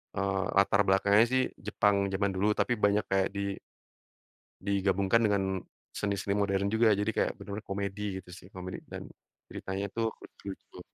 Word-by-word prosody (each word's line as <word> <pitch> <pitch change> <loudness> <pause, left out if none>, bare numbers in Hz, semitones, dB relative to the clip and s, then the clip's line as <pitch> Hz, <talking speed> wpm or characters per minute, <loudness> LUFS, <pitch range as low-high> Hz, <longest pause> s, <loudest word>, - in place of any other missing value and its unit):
eee, 95 -1 0
latar 100 +1 +5
belakangnya 100 +3 +5
sih 130 0 +3 0.2
Jepang 100 -1 +2
zaman 100 0 +1
dulu, 105 +3 +2
tapi 125 - +2
banyak 100 0 +3
kayak 95 0 +2
di 100 0 -2 1.1
digabungkan 100 +2 +2
dengan 95 -3 +1 0.3
seni-seni 100 -1 -1
modern 100 0 +1
juga. 110 -1 +5
Jadi, 105 +2 0
kayak - - +1
benar-benar 105 +1 -7
komedi 100 0 -3
gitu 90 - -16
sih. 90 0 -11
Komedi, 90 0 -6
dan - - -7 0.5
ceritanya 95 +1 -3
tuh 115 -1 0
lucu-lucu. 100 -1 -10
100 Hz, 150 wpm, -30 LUFS, 95-105 Hz, 1.1 s, latar